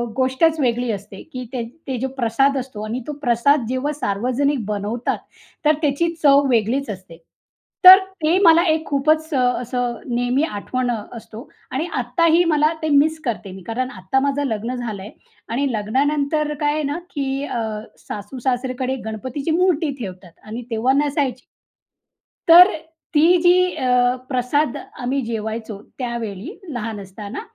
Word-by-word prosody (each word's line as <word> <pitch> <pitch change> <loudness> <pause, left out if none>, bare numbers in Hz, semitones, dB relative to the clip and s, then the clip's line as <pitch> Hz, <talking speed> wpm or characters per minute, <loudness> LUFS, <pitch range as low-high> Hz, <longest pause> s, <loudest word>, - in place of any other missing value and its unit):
गोष्टच 265 +5 +2
वेगळी 245 -2 0
असते, 200 -1 -7
की 255 -1 -5
ते 245 -2 -2 0.2
ते 265 -2 -2
जो 265 - -1
प्रसाद 265 +3 +2
असतो 255 -5 -5
आणि 230 +4 -4
तो 300 - -3
प्रसाद 245 +1 +2
जेव्हा 260 +3 -1
सार्वजनिक 255 +1 -1
बनवतात. 210 +3 -2 0.5
तर 305 - +6
त्याची 300 +3 +1
चव 280 -1 +6
वेगळीच 245 +3 +1
असते. 185 -4 -8 0.7
तर 370 +1 +13 0.3
ते 320 +4 +3
मला 335 -1 +7
एक 315 0 +1
खूपच 310 +3 +1
अ, 270 - +2 0.2
असं 245 -1 -2 0.2
नेहमी 245 +4 +1
आठवण 250 -1 -2
अ, 225 -3 -3 0.2
असतो 225 +1 -11 0.2
आणि 275 +5 -1
आत्ताही 320 +8 +3
मला 305 -1 +3
ते 315 - -1
मिस 305 +2 +3
करते 215 -5 -3
मी. 190 +1 -10
कारण 255 +3 -2
आता 190 +4 -1
माझं 280 +1 0
लग्न 230 +2 -3
झालंय 215 -5 -6 0.4
आणि 270 +4 0
लग्नानंतर 285 +7 0
काय 295 0 +2
आहे 305 0 -1
ना, 290 +2 -2
की 275 -1 -2
अ, 245 - -3 0.5
सासू-सासरेकडे 255 +4 -3
गणपतीची 260 +8 -4
मूर्ती 335 -3 +2
ठेवतात 185 -5 -8 0.2
आणि 230 +3 -6
तेव्हा 230 +4 +2
नसायची. 275 -4 -2 1.0
तर 360 +4 +9 0.4
ती 300 +1 +5 0.2
जी 350 0 +6 0.2
अ, 265 -4 -2 0.4
प्रसाद 280 +4 0 0.3
आम्ही 260 +3 0
जेवायचो. 220 -1 -4 0.2
त्यावेळी 235 - -5 0.2
लहान 225 -3 -4
असताना, 200 - -8
255 Hz, 145 wpm, -21 LUFS, 230-290 Hz, 1.0 s, तर